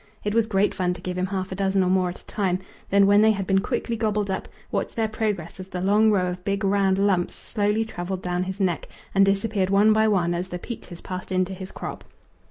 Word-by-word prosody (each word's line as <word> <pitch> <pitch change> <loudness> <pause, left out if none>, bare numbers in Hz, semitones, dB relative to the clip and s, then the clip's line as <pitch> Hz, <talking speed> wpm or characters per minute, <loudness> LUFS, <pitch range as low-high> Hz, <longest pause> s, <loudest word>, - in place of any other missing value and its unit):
It 210 - -1
was 225 -1 +3
great 200 -1 +2
fun 180 -1 0
to - - -11
give 180 0 -4
him 185 +1 -1
half 190 -1 -3
a - - -3
dozen 195 0 +2
or 180 - +1
more 185 -1 +2
at 175 - -7
a - - -26
time, 190 -3 0 0.3
then, 200 0 +5
when 205 +1 +6
they 220 - +6
had 195 -2 -3
been 195 0 +3
quickly 230 +3 -2
gobbled 210 -3 0
up, 190 - -3 0.2
watch - - -2
their 225 -2 +1
progress 205 -6 -3
as 185 - -7
the 185 - -5
long 205 +4 +4
row 195 -4 +3
of 180 0 -7
big 200 +1 -1
round 195 -1 +2
lumps 195 -3 +1
slowly 210 0 0
travelled 185 -2 -5
down 180 0 -1
his 190 +2 -4
neck 180 -4 0 0.3
and 195 - +5
disappeared 195 -1 +1
one 205 +2 +5
by 220 0 +3
one 180 -5 +2
as 175 +2 -2
the 180 - -5
peaches 175 -3 -8
passed 185 0 -6
into 185 +1 +1
his 190 0 -8
crop. - - -7
195 Hz, 245 wpm, -24 LUFS, 185-205 Hz, 0.3 s, when